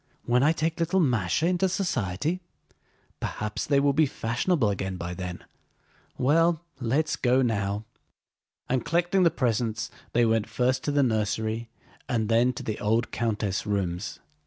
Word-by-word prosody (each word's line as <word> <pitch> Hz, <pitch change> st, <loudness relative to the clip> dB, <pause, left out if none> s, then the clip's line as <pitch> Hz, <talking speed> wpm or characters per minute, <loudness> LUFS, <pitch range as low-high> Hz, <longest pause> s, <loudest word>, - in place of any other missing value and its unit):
"When 125 Hz, +1 st, +3 dB
I 150 Hz, +3 st, +5 dB
take 160 Hz, 0 st, -1 dB
little 170 Hz, +3 st, +2 dB
Másha 125 Hz, -, +2 dB
into 185 Hz, +1 st, +2 dB
society? 170 Hz, -, -1 dB, 0.8 s
Perhaps 105 Hz, 0 st, -3 dB
they 140 Hz, -1 st, +4 dB
will 140 Hz, 0 st, +3 dB
be 155 Hz, +1 st, +4 dB
fashionable 120 Hz, -, 0 dB
again 95 Hz, -1 st, -3 dB
by 90 Hz, +1 st, -4 dB
then. 90 Hz, 0 st, -6 dB, 0.7 s
Well, 165 Hz, +5 st, +3 dB
let's 140 Hz, +6 st, +1 dB
go 130 Hz, +1 st, +3 dB
now." 100 Hz, -2 st, -1 dB, 0.8 s
And 125 Hz, -2 st, 0 dB
collecting 175 Hz, +3 st, +2 dB
the 175 Hz, -, +6 dB
presents 115 Hz, -3 st, -1 dB, 0.2 s
they 120 Hz, 0 st, +4 dB
went 115 Hz, -1 st, +1 dB
first 130 Hz, +1 st, +1 dB
to 145 Hz, -, +1 dB
the 145 Hz, -1 st, +3 dB
nursery 110 Hz, 0 st, -1 dB, 0.4 s
and 115 Hz, -4 st, 0 dB
then 120 Hz, +2 st, +4 dB
to -, -, -7 dB
the 110 Hz, -, -3 dB
old 110 Hz, +3 st, +1 dB
countess' 105 Hz, -4 st, -1 dB
rooms. 95 Hz, -2 st, -2 dB
120 Hz, 150 wpm, -27 LUFS, 105-150 Hz, 0.8 s, the